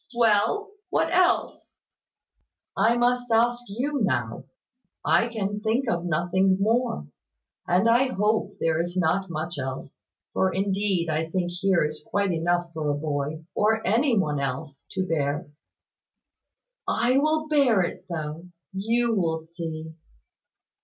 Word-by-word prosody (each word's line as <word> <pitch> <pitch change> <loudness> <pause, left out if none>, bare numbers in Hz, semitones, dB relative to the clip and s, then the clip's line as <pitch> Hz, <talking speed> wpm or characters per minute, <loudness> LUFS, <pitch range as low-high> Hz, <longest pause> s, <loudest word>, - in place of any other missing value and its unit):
"Well, 235 - +2 0.2
what 325 - +1
else?" 365 0 +1 1.0
"I 235 +2 +3
must 245 0 +1
ask 240 +2 +3
you 265 +7 -2
now. 120 - -1 0.6
I 230 - +4
can 205 -3 -3
think 230 +5 0
of 175 -5 -1
nothing 180 +3 +2
more; 225 - +1 0.6
and 180 +5 +3
I 240 +3 +5
hope 215 -3 0
there 165 0 +1
is 175 +2 -4
not 185 +2 +1
much 160 -1 -4
else; 130 0 -6 0.3
for 190 - +2
indeed 195 -2 0
I 160 +1 -1
think 175 0 -1
here 190 -1 +2
is 150 0 -5
quite 200 -3 0
enough 175 +1 0
for 155 -2 -2
a 145 - 0
boy 150 +1 -3
or 220 +1 +1
any 235 +4 +3
one 150 -7 +1
else 140 +1 -5
to 185 - -1
bear." 150 -1 -1 1.4
"I 255 +3 +3
will 310 +1 +1
bear 270 -10 +4
it, 175 - -5
though, 160 +1 -5 0.3
you 230 +4 +1
will 165 -4 0
see." 160 -1 -7
190 Hz, 135 wpm, -25 LUFS, 160-230 Hz, 1.4 s, I